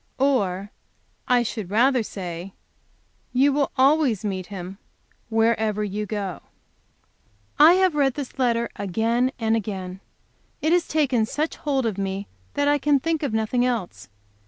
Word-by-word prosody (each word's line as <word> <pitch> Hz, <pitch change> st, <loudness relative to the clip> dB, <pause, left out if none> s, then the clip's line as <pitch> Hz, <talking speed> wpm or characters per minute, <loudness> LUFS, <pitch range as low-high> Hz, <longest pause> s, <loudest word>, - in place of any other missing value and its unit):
Or, 205 Hz, -8 st, 0 dB, 0.6 s
I 245 Hz, -1 st, +4 dB
should 215 Hz, -5 st, -5 dB
rather 245 Hz, +5 st, +3 dB
say, 185 Hz, -3 st, -6 dB, 0.8 s
you 270 Hz, +3 st, +4 dB
will 280 Hz, 0 st, +1 dB
always 265 Hz, -6 st, +3 dB
meet 190 Hz, -3 st, -3 dB
Him 190 Hz, -1 st, -8 dB, 0.5 s
wherever 220 Hz, -2 st, +1 dB
you 210 Hz, +1 st, -3 dB
go." 200 Hz, -4 st, -4 dB, 1.2 s
I 310 Hz, +3 st, +9 dB
have 375 Hz, -2 st, +3 dB
read 275 Hz, -3 st, +2 dB
this 280 Hz, -2 st, -7 dB
letter 235 Hz, -2 st, +2 dB
again 225 Hz, +6 st, 0 dB
and 225 Hz, -1 st, +1 dB
again. 190 Hz, -4 st, -4 dB, 0.6 s
It 315 Hz, +2 st, +1 dB
has 350 Hz, -1 st, +2 dB
taken 265 Hz, -8 st, +1 dB
such 305 Hz, +6 st, -2 dB
hold 275 Hz, -4 st, -1 dB
of 210 Hz, -3 st, -2 dB
me 195 Hz, 0 st, -3 dB, 0.3 s
that 285 Hz, 0 st, +1 dB
I 290 Hz, 0 st, +3 dB
can 285 Hz, 0 st, +3 dB
think 325 Hz, +2 st, -1 dB
of 285 Hz, -, -1 dB
nothing 220 Hz, +3 st, 0 dB
else. 235 Hz, -, -3 dB
230 Hz, 145 wpm, -24 LUFS, 200-275 Hz, 1.2 s, I